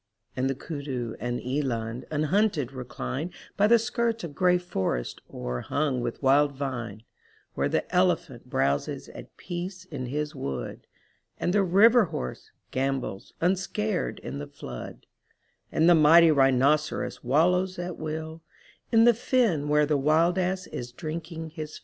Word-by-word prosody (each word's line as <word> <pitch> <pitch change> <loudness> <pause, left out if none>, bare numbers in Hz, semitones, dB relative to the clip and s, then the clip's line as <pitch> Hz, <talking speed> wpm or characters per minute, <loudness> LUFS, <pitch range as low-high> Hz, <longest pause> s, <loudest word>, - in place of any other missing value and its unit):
And 130 +1 0
the 135 - -1
kudu 135 -6 -5
and 120 +2 -2
eland 125 -3 -2
unhunted 155 - +1
recline 135 +5 -5 0.2
By 205 - +4
the 235 +2 +7
skirts 230 -1 -1
of 165 -4 -6
gray 180 +3 +3
forest 95 - -3
o'erhung 125 - -2
with 120 +3 -4
wild 140 +2 +4
vine; 120 -6 -5 0.5
Where - - 0
the - - 0
elephant 170 -9 +1
browses 70 - -1
at - - -12
peace 180 +1 -6
in 140 -8 -6
his 150 +3 -3
wood. 70 -2 -5 0.5
And 175 - 0
the 205 - +4
river 210 +5 +6
horse 65 - -6 0.2
gambols 135 -6 -2
unscared 190 +2 0
in 140 - -5
the 145 - -6
flood, 65 - -9 0.7
And 160 - +3
the 175 - +8
mighty 165 +1 +7
rhinoceros 140 +2 +2
wallows 180 +8 +2
at 175 0 -4
will 160 +1 -5 0.5
In 225 0 +6
the 240 0 +7
fen 215 - +1
where 150 0 +4
the 150 0 +1
wild 160 +6 +3
ass 185 0 -1
is 120 0 -6
drinking 160 +2 -6
his 155 -1 -7
fill. - - -13
155 Hz, 145 wpm, -27 LUFS, 130-180 Hz, 0.7 s, the